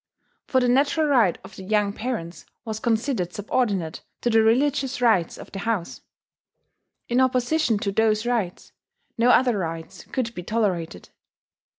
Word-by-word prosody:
For 260 - +3
the 250 - +1
natural 285 +5 +3
right 245 - +3
of 190 0 -12
the 190 - -8
young 205 0 +1
parents 215 -8 -5 0.2
was 220 -1 -4
considered 225 -5 -1
subordinate 200 -6 -1 0.2
to 240 - +1
the 225 0 +5
religious 270 +4 +1
rights 220 -9 +2
of - - -11
the 195 - -6
house. 215 -5 -3 1.1
In 245 +2 +2
opposition 255 0 +2
to 200 0 -2
those 215 +1 +1
rights, 225 -7 -2 0.5
no 240 +2 +4
other 245 -4 +4
rights 165 +1 -6
could 240 -3 -3
be 180 - -6
tolerated. 180 - -2
225 Hz, 150 wpm, -24 LUFS, 190-250 Hz, 1.1 s, the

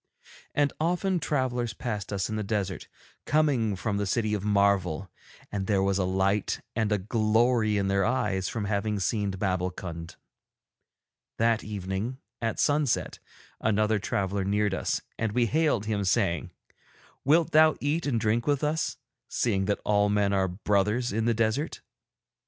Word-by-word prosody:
And 145 -1 +2
often 180 +3 +1
travellers 125 -6 -1
passed 105 -6 -4
us 100 -1 -1
in 110 - -4
the 110 - -1
desert, 105 -2 -2 0.4
coming 140 -9 +2
from 100 +2 -2
the 100 -1 -1
City 110 +2 0
of 105 -2 -2
Marvel, 100 -4 +1 0.4
and 100 -2 -3
there 100 -2 +2
was 100 0 +1
a - - +2
light 95 +2 0 0.2
and 110 -2 0
a 105 - +3
glory 110 +2 +2
in 100 -1 0
their 100 0 +2
eyes 105 -6 0
from 110 -3 -3
having 105 0 -1
seen 100 +2 0
Babbulkund. 90 -3 -3 1.2
That 115 0 +2
evening, 100 +4 -4 0.2
at 115 -1 -2
sunset, 145 -3 +1 0.4
another 110 0 +2
traveller 100 0 -1
neared 105 +1 +1
us, - - -1 0.2
and 110 -2 -1
we 120 0 +3
hailed 150 -5 +1
him, 105 -2 -1
saying: 95 - +1 0.7
'Wilt 160 +4 +3
thou 155 0 +6
eat 150 +3 -1
and 120 -5 +1
drink 110 +3 0
with 145 0 +1
us, 155 +2 0 0.3
seeing 100 -5 0
that 100 +1 -1
all 105 0 +3
men 100 -1 +2
are 95 -1 +2
brothers 105 +5 0
in 110 +1 0
the 115 -1 +2
desert?' 115 +7 -1
105 Hz, 155 wpm, -27 LUFS, 100-120 Hz, 1.2 s, thou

